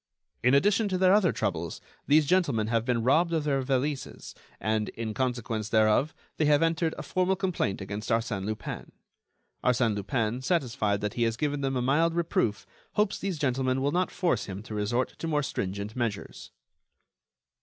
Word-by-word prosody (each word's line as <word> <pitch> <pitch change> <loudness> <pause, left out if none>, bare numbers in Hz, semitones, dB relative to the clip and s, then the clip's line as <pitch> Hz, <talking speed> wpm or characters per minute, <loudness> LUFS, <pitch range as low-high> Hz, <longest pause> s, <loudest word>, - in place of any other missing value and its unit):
"In 125 +3 +4
addition 205 +8 +3
to 185 - 0
their 185 0 +5
other 200 -5 +4
troubles, 80 +1 -3 0.3
these 150 +1 +5
gentlemen 145 -10 +2
have 115 -1 +1
been 120 -2 0
robbed 165 +7 +3
of 160 -2 +1
their 140 -2 +1
valises, 135 +2 -2 0.3
and, 110 0 0
in 110 -1 -5
consequence 120 -4 -2
thereof, 110 +7 +3 0.2
they 155 - +2
have 150 +1 +4
entered 165 0 +1
a - - -5
formal 185 +1 +1
complaint 185 - -1
against 100 +3 -5
Arsène 115 -4 0
Lupin." 110 0 -5 0.7
"Arsène 125 -3 +2
Lupin, 110 +3 -1
satisfied 120 - 0
that 105 0 -2
he 120 - -3
has 115 -1 +1
given 145 +1 -1
them 135 -1 -1
a 125 - 0
mild 165 +6 +2
reproof, 120 -11 0 0.3
hopes 210 -1 +1
these 195 -4 -3
gentlemen 130 -2 0
will 140 +2 +1
not 180 +3 +1
force 170 - 0
him 100 +1 -7
to 110 - -8
resort 110 +5 0
to 165 - -3
more 150 -2 +1
stringent 100 -2 -4
measures." 115 -5 -4
130 Hz, 175 wpm, -28 LUFS, 110-160 Hz, 0.7 s, their